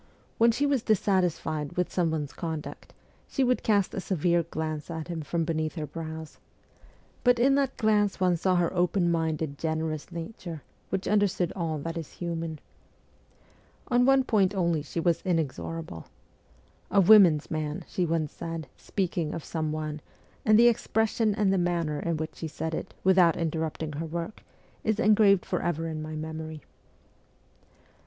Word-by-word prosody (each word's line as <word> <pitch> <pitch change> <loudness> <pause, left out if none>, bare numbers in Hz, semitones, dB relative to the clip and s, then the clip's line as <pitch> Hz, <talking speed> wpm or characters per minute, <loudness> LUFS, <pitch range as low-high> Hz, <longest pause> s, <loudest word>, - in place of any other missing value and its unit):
When 230 +1 +6
she 275 +5 0
was 280 -4 +2
dissatisfied 180 -8 0
with 180 - 0
some 175 -3 +2
one's 150 -3 -3
conduct, 160 -3 -6 0.4
she 270 - 0
would 250 0 +2
cast 205 -3 +2
a - - -2
severe 175 -2 +1
glance 155 -2 -4
at 160 0 -5
him 170 -2 -3
from 165 +3 -1
beneath 160 -1 -2
her 155 -3 -3
brows; 160 0 -7 0.8
but 245 -1 +5
in 260 +4 +4
that 275 -1 +1
glance 210 -2 +2
one 180 -1 +3
saw 185 +2 +1
her 175 0 +1
open 175 0 +2
minded, 160 -3 -1
generous 160 0 -2
nature, 170 - -7 0.3
which 190 0 -2
understood 200 -4 +1
all 165 -4 -2
that 165 +3 -4
is 160 - -9
human. 165 -2 -4 1.3
On 245 -1 +4
one 270 +1 +5
point 205 -5 +2
only 170 -4 +1
she 150 +3 -5
was 170 0 +1
inexorable. 165 - -3 0.4
' - - -33
A 200 - +3
women's 180 -6 +6
man,' 155 -1 -3
she 185 - -1
once 160 -3 0
said, 165 -2 -5
speaking 180 -5 -2
of 165 - -6
some 155 -2 -2
one, 155 -1 -4 0.4
and 215 -1 +5
the 235 +1 +7
expression 220 -2 +1
and 205 -3 +2
the 190 - +2
manner 170 -4 0
in 170 0 -1
which 155 0 -5
she 165 - -4
said 160 +1 -4
it, - - -5
without 180 -3 +5
interrupt 160 -1 -2
ing 155 - -3
her 155 +3 -4
work, 170 +5 -5 0.4
is 220 -1 0
engraved 210 -4 +5
for - - -1
ever 165 -1 -1
in 155 -1 -4
my 155 0 -6
memory. 155 -1 -6
170 Hz, 165 wpm, -28 LUFS, 160-195 Hz, 1.3 s, the